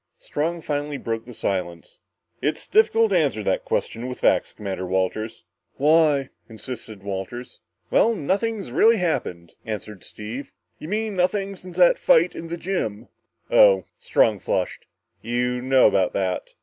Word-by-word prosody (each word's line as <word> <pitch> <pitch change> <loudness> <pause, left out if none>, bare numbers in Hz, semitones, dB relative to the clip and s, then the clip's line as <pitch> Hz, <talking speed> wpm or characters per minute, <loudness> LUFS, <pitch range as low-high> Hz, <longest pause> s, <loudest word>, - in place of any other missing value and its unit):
Strong 165 +3 -3
finally 145 -1 -3
broke 115 -3 -4
the 125 - -10
silence. 85 -5 -4 0.4
"It's 150 - -2
difficult 230 - +4
to 185 - +4
answer 135 -9 0
that 95 - 0
question 120 +2 -2
with 125 - -7
facts, - - +3
Commander 95 -3 -5
Walters." 95 +4 -2 0.3
"Why?" 150 -2 +3 0.2
insisted 110 -3 -8
Walters. 100 +5 -6 0.3
"Well, 230 0 +4
nothing's 200 +5 -1
really 230 +1 +5
happened," 90 - -2
answered 105 -2 -6
Steve. 115 +6 -8 0.3
"You 155 - -8
mean, 215 +2 -2
nothing 195 +2 0
since 185 -1 -11
the 180 -1 +7
fight 170 +3 +4
in 165 - -7
the 170 +1 -4
gym?" 125 - -3 0.4
"Oh - - +6
" - - -52
Strong 485 +1 +2
flushed. - - -2 0.3
"You 125 +1 -1
know 130 +1 +4
about 95 -2 +3
that?" 95 -2 -2
140 Hz, 150 wpm, -23 LUFS, -, 0.4 s, the